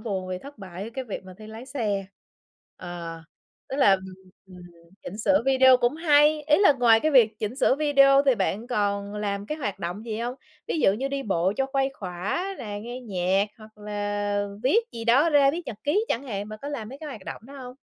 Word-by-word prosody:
buồn 190 -4 -4
vì 185 - -3
thất 280 +4 -13
bại, 190 -1 -8
ở - - -6
cái 265 - -4
việc 205 -4 -6
mà 185 -1 -11
thi 215 - -11
lái 225 +3 -10
xe. 215 -8 -2 0.7
Ờ, 170 -2 -7 0.5
tức 270 - -4
là, 235 -9 +5
ừm, 190 0 0 0.4
ừm, 180 -1 -13 0.4
chỉnh 200 - -8
sửa 285 +4 +3
video 260 -1 +6
cũng 245 +2 +1
hay, 300 -1 +4
ý 300 0 +3
là 390 -7 +6
ngoài 235 -4 +4
cái 310 - +1
việc 225 -5 +4
chỉnh 220 +3 -4
sửa 265 - +3
video 275 -2 +5
thì 265 - +5
bạn 205 +2 -2
còn 205 -3 -1
làm 205 -1 -3
cái 305 - -4
hoạt 205 -9 -3
động 180 +6 -5
gì 220 -2 -4
hông? 240 +2 -3 0.3
Ví 325 - -2
dụ 195 - +5
như 260 +6 -2
đi 275 0 -3
bộ 190 -4 0
cho 270 - 0
khuây 270 0 0
khỏa 190 - -3
nè, 205 -2 -6
nghe 240 +3 -7
nhạc 195 -3 0
hoặc 215 -1 -16
là 205 -1 -2 0.2
viết 265 - +4
gì 230 - -6
đó 270 +8 +4
ra, 285 -2 +5
viết 335 +4 -4
nhật 215 - -6
ký 365 +10 +2
chẳng 235 - -1
hạn, 205 -6 -5
bạn 215 0 -8
có 285 - -4
làm 270 -7 -5
mấy 270 +3 -10
cái 310 - -8
hoạt 220 -9 -9
động - - -7
đó 275 - -12
hông? 250 -2 -9
225 Hz, 230 wpm, -25 LUFS, 200-275 Hz, 0.7 s, video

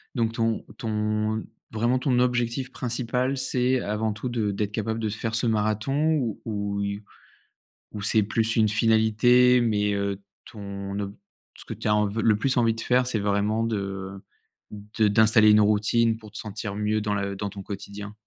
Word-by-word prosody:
donc 115 -2 0
ton 115 -1 -1
ton 110 0 -1 0.3
vraiment 120 +3 +1
ton 125 -2 +1
objectif 125 +1 0
principal, 125 +2 -1
c'est 130 0 +1
avant 105 +1 -1
tout 110 +4 -5
de 110 -4 -1
d'être 105 +1 -2
capable 110 +1 -2
de 110 - -1
faire 110 +2 -4
ce 115 - +1
marathon 110 +8 +1
ou 120 -8 -1
ouille 100 -1 -3 0.9
ou 105 - -6
c'est 105 +2 +2
plus 115 +2 0
une 110 -1 +4
finalité? 115 +3 +4
Mais, 105 -3 +1
heu, 100 0 -2 0.3
ton 100 -1 -6
ob 100 0 -5 0.4
ce - - -11
que - - -5
tu - - -5
as 105 - +3
env 105 -1 +2
heu, - - +1
le 110 -2 +4
plus 130 +4 0
envie 115 -2 +3
de 115 - -6
faire, 125 0 +2
c'est 115 -4 -1
vraiment 105 +2 0
de 100 -3 -4 0.5
de 105 +1 -1
d'installer 110 0 +5
une 105 - +6
routine 110 +2 +2
pour 110 -2 -14
te 110 - -9
sentir 105 -1 -5
mieux 105 +1 0
dans 105 -1 -1
la 100 -1 -2
dans 100 +1 -4
ton 100 -1 -9
quotidien? 100 +1 -7
110 Hz, 180 wpm, -25 LUFS, 105-115 Hz, 0.9 s, une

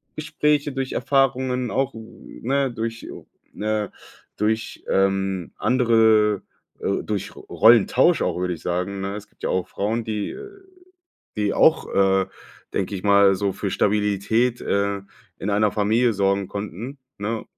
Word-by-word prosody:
Gespräche, 150 -1 0
durch 135 -1 -3
Erfahrungen 130 -1 +1
auch, 135 0 0
ne, 130 +4 -3
durch 115 0 -5 0.4
ne 105 -1 -2 0.5
durch, 110 +2 -1
ähm, 95 -2 0
andere, 110 -4 +3 0.4
äh 100 - -1
durch 105 -3 -4
Ro - - -11
Rollentausch 120 - +5
auch, - - 0
würde 90 0 -1
ich 80 - -10
sagen, 90 +3 -2
ne? 100 +1 -3
Es 105 0 -8
gibt - - -34
ja - - -1
auch 95 -1 -1
Frauen, 110 +4 -2
die 110 -2 -3
äh 410 -1 -9 0.9
die 105 -1 0
auch, - - +4
äh, 95 -1 +3 0.5
denke 100 +1 -1
ich 90 - -8
mal, 100 -1 +5
so 100 0 -1
für - - -4
Stabilität, 105 +4 +1
äh, 100 0 -1 0.4
in 105 - -3
einer 105 +1 +2
Familie 110 +3 +2
sorgen 100 -1 0
konnten, 105 - -6 0.2
ne? 110 +2 -3
105 Hz, 145 wpm, -23 LUFS, 100-120 Hz, 0.9 s, Rollentausch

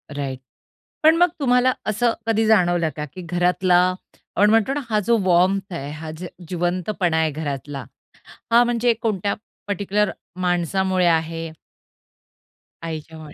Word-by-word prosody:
Right, 135 -2 -4 0.6
पण 320 +1 +7
मग 355 +1 +6
तुम्हाला 250 -1 +3 0.2
असं 230 +2 +1
कधी 225 0 +2
जाणवलं 175 -6 +3
का 150 - -4
की 185 - -8
घरातला 180 +1 +2 0.6
आपण 205 +2 +4
म्हणतो 225 +4 +3
ना, 290 - -1
हा 215 -1 +2
जो 235 -1 +4
वार्म्थ 185 +2 +2
आहे 140 -3 -5
हा 155 +1 -7
जो 180 +1 -6 0.2
जिवंतपणा 175 0 -1
आहे 160 -1 +2
घरातला, 140 -2 -5 0.7
हा 235 +1 +7
म्हणजे 240 0 +2
कोणत्या 205 -3 0 0.3
पर्टिक्युलर 205 0 0 0.3
माणसामुळे 180 +1 +1
आहे 165 0 0 1.4
आईच्यामुळे. 160 -1 -7
180 Hz, 130 wpm, -22 LUFS, 160-215 Hz, 1.4 s, पण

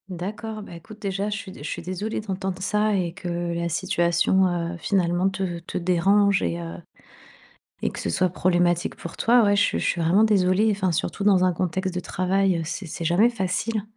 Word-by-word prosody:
D'accord. 215 +5 -5
Bah, 175 - -10
écoute, 210 +6 -12
déjà, 200 +1 -2
je 210 - -2
suis 200 -3 -8
dé 145 - -11
je - - -4
suis - - -4
désolée 185 +4 -3
d'entendre 190 -2 -4
ça 210 +2 +1
et 175 -3 -1
que 175 -2 -3
la 170 0 -2
situation, 175 +1 +2
heu, 175 -1 -2
finalement, 180 0 +1
te 185 -3 -3
te 170 - -6
dérange 195 +3 +3
et 85 -1 -1
heu 85 -1 -6 1.1
et - - +1
que - - -8
ce - - -2
soit 185 - +2
problématique, 175 -1 +1
pour 170 - -9
toi. 240 +1 +4
Ouais. 205 -1 +3
Je 200 - +4
suis - - +1
je - - -2
suis 170 - 0
vraiment 170 +6 +4
désolée, 205 -1 +3
enfin, 195 -3 0
surtout 180 +5 -2
dans 190 -3 +4
un 185 - +3
contexte 185 +2 -2
de 180 - -1
travail, 185 +1 +1
heu, - - -2
c'est 180 +4 -5
c'est 165 +1 -6
jamais 180 +9 +4
facile. 215 +1 -2
185 Hz, 210 wpm, -24 LUFS, 175-200 Hz, 1.1 s, toi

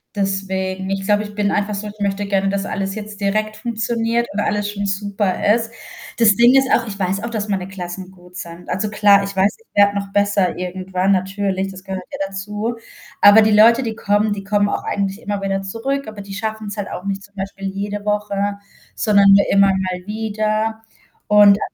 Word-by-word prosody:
Deswegen, 190 -1 -2
ich 195 0 -2
glaube, 205 +1 +2
ich 210 -1 -8
bin 205 -1 0
einfach 205 0 -1
so, 200 +2 -5
ich 210 0 -10
möchte 200 0 -1
gerne, 195 -1 +1
dass 200 0 -2
alles 195 -1 -3
jetzt 210 -1 -8
direkt 215 +2 -1
funktioniert 230 +1 -1
und 205 - -2
alles 205 0 -1
schon 200 -1 -3
super 200 0 0
ist. 225 0 -1 0.5
Das 220 -3 +5
Ding 240 +3 +6
ist 270 0 +4
auch, 230 - +2
ich 200 -2 -6
weiß 195 0 -1
auch, 235 - -3
dass 215 -2 -3
meine 190 -3 -2
Klassen 185 -1 -7
gut 180 -1 -18
sind. 170 0 -9
Also 190 +4 -1
klar, 205 -1 +5
ich 200 0 -5
weiß, 190 +2 +2
ich 455 - -27
werde 200 0 +5
noch 200 -1 -4
besser 200 -2 +1
irgendwann 185 +1 -1
natürlich, 195 0 -1
das 190 -1 -11
gehört 190 -1 -5
ja - - -5
dazu. 210 +4 -4 0.5
Aber 205 +2 +8
die 215 - +3
Leute, 230 +4 +6
die 225 -2 -3
kommen, 205 0 +1
die 200 -1 -6
kommen 205 0 +1
auch - - -2
eigentlich 200 +1 -2
immer 205 -1 -3
wieder 195 0 -1
zurück, 230 +8 -3
aber 215 -1 -8
die 195 0 -9
schaffen's 215 0 -4
halt 205 -2 -4
auch 180 - -7
nicht 195 0 -3
zum 200 0 -18
Beispiel 195 0 -5
jede 205 +1 -4
Woche, 205 -1 -1 0.4
sondern 200 -2 +4
nur 200 0 +6
immer 200 0 +5
mal 185 -1 -2
wieder. 215 +1 -1 0.5
Und 205 -1 +6
200 Hz, 205 wpm, -19 LUFS, 195-210 Hz, 0.5 s, Aber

